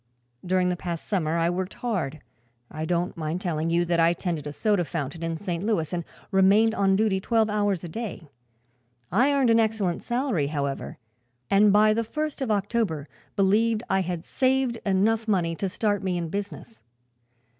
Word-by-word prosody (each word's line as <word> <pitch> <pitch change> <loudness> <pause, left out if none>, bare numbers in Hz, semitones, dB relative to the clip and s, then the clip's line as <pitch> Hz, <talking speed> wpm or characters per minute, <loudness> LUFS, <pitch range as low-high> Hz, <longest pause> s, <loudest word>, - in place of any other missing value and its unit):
During 180 0 +1
the 180 - 0
past 170 -2 -5
summer 170 -5 0
I 170 +1 +2
worked 185 +1 -3
hard. 165 - -3 0.5
I 155 +1 -4
don't 175 +1 -1
mind 160 +1 -3
telling 165 -4 -1
you 170 +1 +2
that 170 0 +1
I 165 +1 +5
tended 170 -5 -3
a - - -4
soda 205 +3 +1
fountain 150 +1 -4
in 165 -1 -2
St. 175 -1 -4
Louis 200 -7 0
and 175 -1 -1 0.3
remained 200 +4 +4
on 195 -2 +2
duty 205 -2 +2
twelve 220 +1 +1
hours 205 -4 0
a - - -5
day. 195 -3 -6 0.8
I 250 - +4
earned 270 -4 +3
an 230 - +5
excellent 215 -5 0
salary, 240 - 0
however, 145 +1 -3 0.5
and 200 +1 +6
by 215 +1 +5
the 230 +1 0
first 305 +5 -4
of 260 - -1
October 205 -7 0 0.3
believed 215 +3 +2
I 190 - +3
had 175 -2 -3
saved 260 -1 +1
enough 215 +4 +2
money 175 -5 +1
to 195 - -2
start 205 0 0
me 185 -2 -1
in 170 -2 -3
business. 205 +4 -6
190 Hz, 175 wpm, -26 LUFS, 170-220 Hz, 0.8 s, and